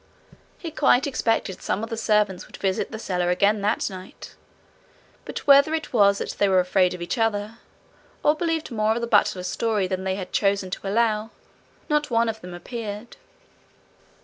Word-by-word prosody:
He 330 Hz, -, -7 dB
quite 275 Hz, -4 st, +3 dB
expected 225 Hz, -8 st, -1 dB
some 210 Hz, -, -2 dB
of 225 Hz, -, -6 dB
the -, -, -1 dB
servants 210 Hz, -4 st, +1 dB
would -, -, -12 dB
visit 190 Hz, -1 st, -1 dB
the 220 Hz, -, -5 dB
cellar 180 Hz, -5 st, -1 dB
again 200 Hz, +3 st, +2 dB
that 210 Hz, +2 st, 0 dB
night, 185 Hz, -2 st, -10 dB, 0.9 s
but -, -, -6 dB
whether 280 Hz, +2 st, +6 dB
it 320 Hz, -, -5 dB
was 200 Hz, -3 st, +5 dB
that -, -, -4 dB
they 200 Hz, -, +3 dB
were 190 Hz, -1 st, +4 dB
afraid 180 Hz, 0 st, +2 dB
of 175 Hz, -, -6 dB
each 175 Hz, -, -3 dB
other, 225 Hz, 0 st, -1 dB, 0.6 s
or 300 Hz, -, +5 dB
believed 325 Hz, -2 st, -2 dB
more 215 Hz, -1 st, +1 dB
of 235 Hz, -, -2 dB
the -, -, 0 dB
butler's 205 Hz, -5 st, +2 dB
story 215 Hz, +1 st, 0 dB
than 185 Hz, 0 st, -3 dB
they 190 Hz, 0 st, -1 dB
had 185 Hz, -2 st, -7 dB
chosen 195 Hz, -2 st, +1 dB
to 195 Hz, -, -5 dB
allow, 215 Hz, +1 st, +1 dB, 0.6 s
not 300 Hz, 0 st, +1 dB
one 230 Hz, -1 st, +2 dB
of 220 Hz, 0 st, -5 dB
them 180 Hz, 0 st, -8 dB
appeared. 215 Hz, +3 st, -7 dB
210 Hz, 180 wpm, -24 LUFS, 190-235 Hz, 0.9 s, whether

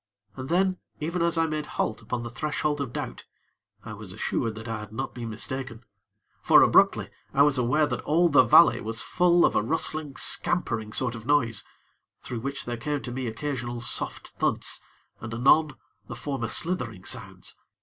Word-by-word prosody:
And 130 Hz, +1 st, -7 dB
then, 185 Hz, +1 st, +2 dB, 0.2 s
even 170 Hz, +3 st, -2 dB
as 170 Hz, 0 st, +1 dB
I 165 Hz, -, +3 dB
made 155 Hz, -1 st, -3 dB
halt 110 Hz, -, -1 dB
upon 120 Hz, -, -4 dB
the 120 Hz, -, -5 dB
threshold 145 Hz, +3 st, -2 dB
of 135 Hz, -4 st, -4 dB
doubt, -, -, -6 dB, 0.6 s
I -, -, -6 dB
was -, -, -7 dB
assured 115 Hz, -2 st, -2 dB
that 115 Hz, +2 st, -8 dB
I 115 Hz, -1 st, -3 dB
had 105 Hz, 0 st, -9 dB
not 125 Hz, +5 st, -4 dB
been 120 Hz, -2 st, -6 dB
mistaken; 120 Hz, +1 st, -5 dB, 0.6 s
for, -, -, +7 dB
abruptly, -, -, +4 dB, 0.2 s
I 140 Hz, -, +6 dB
was 145 Hz, -3 st, +3 dB
aware 130 Hz, +6 st, +2 dB
that 145 Hz, -, -3 dB
all 170 Hz, +4 st, +3 dB
the 145 Hz, -5 st, +6 dB
valley 130 Hz, +7 st, +6 dB
was 115 Hz, +2 st, -1 dB
full 175 Hz, -1 st, +3 dB
of -, -, +1 dB
a -, -, +3 dB
rustling, 155 Hz, +3 st, -1 dB
scampering 115 Hz, -11 st, 0 dB
sort 125 Hz, +2 st, +1 dB
of 115 Hz, 0 st, -9 dB
noise, 115 Hz, -8 st, +2 dB, 0.6 s
through 120 Hz, -, -5 dB
which 140 Hz, +4 st, -4 dB
there 120 Hz, -1 st, -4 dB
came 145 Hz, +4 st, -3 dB
to 125 Hz, -, -5 dB
me 130 Hz, 0 st, -3 dB
occasional 120 Hz, 0 st, -4 dB
soft 120 Hz, -, -2 dB
thuds, -, -, -1 dB, 0.4 s
and 110 Hz, +1 st, -6 dB
anon 140 Hz, +4 st, +4 dB, 0.3 s
the 120 Hz, -, -7 dB
former 130 Hz, -1 st, -3 dB
slithering 115 Hz, -, -2 dB
sounds. -, -, -4 dB
130 Hz, 180 wpm, -26 LUFS, 115-150 Hz, 0.6 s, for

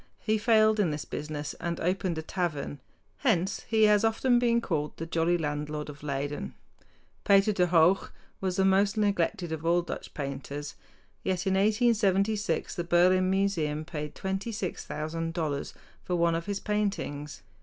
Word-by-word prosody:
He 215 Hz, 0 st, 0 dB
failed 215 Hz, -1 st, +4 dB
in 195 Hz, -5 st, +3 dB
this 150 Hz, -1 st, -4 dB
business 150 Hz, -1 st, -5 dB
and 170 Hz, -1 st, -3 dB
opened 180 Hz, -1 st, -1 dB
a 160 Hz, -, -3 dB
tavern. 155 Hz, -5 st, -3 dB, 0.4 s
Hence 195 Hz, -, +1 dB
he 220 Hz, -1 st, +3 dB
has 210 Hz, -1 st, +5 dB
often 240 Hz, +2 st, +3 dB
been 235 Hz, -1 st, +3 dB
called 150 Hz, -9 st, -2 dB
"the 165 Hz, -, -4 dB
jolly 165 Hz, +1 st, +1 dB
landlord 150 Hz, -1 st, -3 dB
of 140 Hz, -1 st, -10 dB
Leyden." 140 Hz, -, -4 dB, 0.7 s
Pieter 200 Hz, +1 st, +4 dB
de 180 Hz, -2 st, +2 dB
Hooch 170 Hz, +2 st, +4 dB, 0.3 s
was 185 Hz, -2 st, -1 dB
the 190 Hz, 0 st, +2 dB
most 200 Hz, +2 st, +3 dB
neglected 190 Hz, -4 st, 0 dB
of 160 Hz, -1 st, -4 dB
all 170 Hz, +1 st, +2 dB
Dutch -, -, -7 dB
painters; 145 Hz, +1 st, -5 dB, 0.5 s
yet 185 Hz, 0 st, -1 dB
in 190 Hz, -, +2 dB
1876 210 Hz, 0 st, +2 dB
the 175 Hz, -, -3 dB
Berlin 180 Hz, +2 st, +4 dB
Museum 170 Hz, -6 st, 0 dB
paid 150 Hz, -2 st, -6 dB
$26,000 165 Hz, -6 st, -3 dB, 0.3 s
for 180 Hz, -, -2 dB
one 170 Hz, -1 st, +2 dB
of 165 Hz, +3 st, -3 dB
his 200 Hz, -1 st, -2 dB
paintings. 195 Hz, -9 st, -3 dB
180 Hz, 150 wpm, -28 LUFS, 155-200 Hz, 0.7 s, has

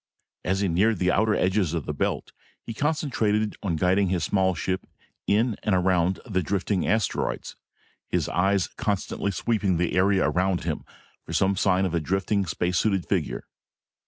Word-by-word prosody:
As 95 Hz, +2 st, 0 dB
he 100 Hz, -, +2 dB
neared 100 Hz, +6 st, +2 dB
the 90 Hz, 0 st, +2 dB
outer 110 Hz, +3 st, +2 dB
edges 90 Hz, -3 st, +1 dB
of 80 Hz, -, -3 dB
the 75 Hz, -, -3 dB
belt, 70 Hz, -, -2 dB, 0.3 s
he 115 Hz, -, -5 dB
concentrated 115 Hz, -7 st, 0 dB
on 90 Hz, -5 st, -1 dB
guiding 95 Hz, +4 st, +2 dB
his 90 Hz, -3 st, 0 dB
small 95 Hz, +2 st, +1 dB
ship 95 Hz, +2 st, -3 dB, 0.4 s
in 110 Hz, +2 st, +2 dB
and 105 Hz, -, +1 dB
around 90 Hz, 0 st, +2 dB
the 95 Hz, -7 st, 0 dB
drifting 95 Hz, +1 st, -1 dB
asteroids, 110 Hz, -2 st, -1 dB, 0.5 s
his -, -, 0 dB
eyes 95 Hz, +1 st, +1 dB
constantly 100 Hz, -1 st, -2 dB
sweeping 100 Hz, -1 st, 0 dB
the 85 Hz, 0 st, 0 dB
area 95 Hz, +1 st, +3 dB
around 90 Hz, 0 st, 0 dB
him 80 Hz, -3 st, -3 dB, 0.4 s
for -, -, -8 dB
some 95 Hz, +1 st, +2 dB
sign 95 Hz, -1 st, +2 dB
of 90 Hz, -, -2 dB
a 85 Hz, -, +2 dB
drifting 95 Hz, +4 st, 0 dB
space 90 Hz, +2 st, 0 dB
suited 95 Hz, -5 st, +1 dB
figure. -, -, -2 dB
95 Hz, 165 wpm, -25 LUFS, 90-105 Hz, 0.5 s, area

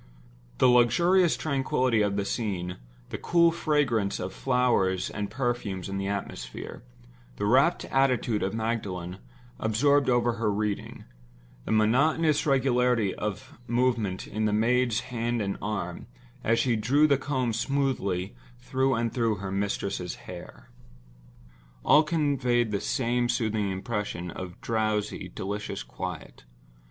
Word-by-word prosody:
The 130 Hz, -, +5 dB
luxurious 170 Hz, -, +4 dB
tranquillity 130 Hz, -5 st, +1 dB
of 100 Hz, -1 st, +1 dB
the 100 Hz, -1 st, -1 dB
scene; 95 Hz, -6 st, -3 dB, 0.3 s
the -, -, -5 dB
cool 170 Hz, -1 st, +4 dB
fragrance 145 Hz, -11 st, 0 dB
of 95 Hz, -, -4 dB
flowers 120 Hz, -8 st, +1 dB
and 105 Hz, -1 st, -4 dB
perfumes 120 Hz, -8 st, -2 dB
in 95 Hz, 0 st, -3 dB
the 100 Hz, -, -2 dB
atmosphere; 95 Hz, -12 st, -5 dB, 0.5 s
the 100 Hz, -, -2 dB
rapt 135 Hz, +10 st, +3 dB
attitude 125 Hz, -5 st, +1 dB
of 95 Hz, +2 st, -1 dB
Magdalen, 100 Hz, -6 st, -3 dB, 0.4 s
absorbed 140 Hz, +6 st, +2 dB
over 120 Hz, -1 st, +2 dB
her 105 Hz, -2 st, +2 dB
reading; 105 Hz, 0 st, -3 dB, 0.6 s
the -, -, -3 dB
monotonous 145 Hz, +9 st, +3 dB
regularity 125 Hz, -6 st, +2 dB
of 105 Hz, -1 st, -5 dB
movement 120 Hz, -6 st, 0 dB
in 110 Hz, +1 st, -2 dB
the 105 Hz, -, +1 dB
maid's 120 Hz, +1 st, +2 dB
hand 120 Hz, -2 st, -2 dB
and 100 Hz, -2 st, -2 dB
arm, 100 Hz, -4 st, -4 dB, 0.4 s
as 115 Hz, +1 st, +2 dB
she 120 Hz, -1 st, +2 dB
drew 130 Hz, +8 st, +3 dB
the 140 Hz, -3 st, +3 dB
comb 130 Hz, -5 st, -1 dB
smoothly 115 Hz, -8 st, -1 dB, 0.2 s
through 130 Hz, +2 st, 0 dB
and 115 Hz, 0 st, -1 dB
through 115 Hz, -3 st, +1 dB
her 100 Hz, -1 st, -6 dB
mistress's 100 Hz, -2 st, -2 dB
hair—all -, -, -4 dB
conveyed 140 Hz, -7 st, +1 dB
the 100 Hz, -, -1 dB
same 120 Hz, -1 st, 0 dB
soothing 110 Hz, -4 st, 0 dB
impression 95 Hz, -3 st, -3 dB
of 90 Hz, 0 st, -8 dB
drowsy, 110 Hz, -2 st, -1 dB
delicious 105 Hz, +2 st, -4 dB
quiet. -, -, -7 dB
115 Hz, 125 wpm, -27 LUFS, 100-130 Hz, 0.6 s, The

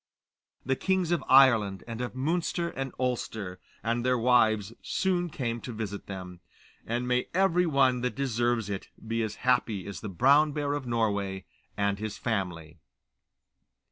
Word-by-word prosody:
The 135 Hz, +2 st, +1 dB
kings 185 Hz, +1 st, 0 dB
of 175 Hz, -, +1 dB
Ireland 115 Hz, -8 st, +5 dB
and 115 Hz, 0 st, -5 dB
of 125 Hz, 0 st, -4 dB
Munster 170 Hz, +5 st, -1 dB
and 135 Hz, -4 st, -4 dB
Ulster, 110 Hz, -7 st, -2 dB, 0.2 s
and 115 Hz, +1 st, 0 dB
their 125 Hz, 0 st, +2 dB
wives, 110 Hz, -3 st, +3 dB
soon 180 Hz, -2 st, 0 dB
came 120 Hz, -6 st, -3 dB
to 125 Hz, -, -6 dB
visit 105 Hz, -3 st, -5 dB
them, 90 Hz, -2 st, -7 dB, 0.5 s
and 120 Hz, +2 st, -1 dB
may 125 Hz, 0 st, +1 dB
every 180 Hz, -2 st, +3 dB
one 130 Hz, -4 st, +3 dB
that 125 Hz, -3 st, -2 dB
deserves 120 Hz, -4 st, 0 dB
it 100 Hz, -2 st, -5 dB, 0.2 s
be 115 Hz, +1 st, 0 dB
as 110 Hz, -1 st, -2 dB
happy 120 Hz, -6 st, +2 dB
as 100 Hz, -3 st, -7 dB
the 105 Hz, -, -5 dB
Brown 140 Hz, -, +4 dB
Bear 145 Hz, -1 st, -1 dB
of 145 Hz, -3 st, -4 dB
Norway 100 Hz, -5 st, -1 dB, 0.3 s
and 100 Hz, 0 st, 0 dB
his 110 Hz, -1 st, -4 dB
family. 90 Hz, -8 st, -3 dB
120 Hz, 155 wpm, -28 LUFS, 105-135 Hz, 0.5 s, Ireland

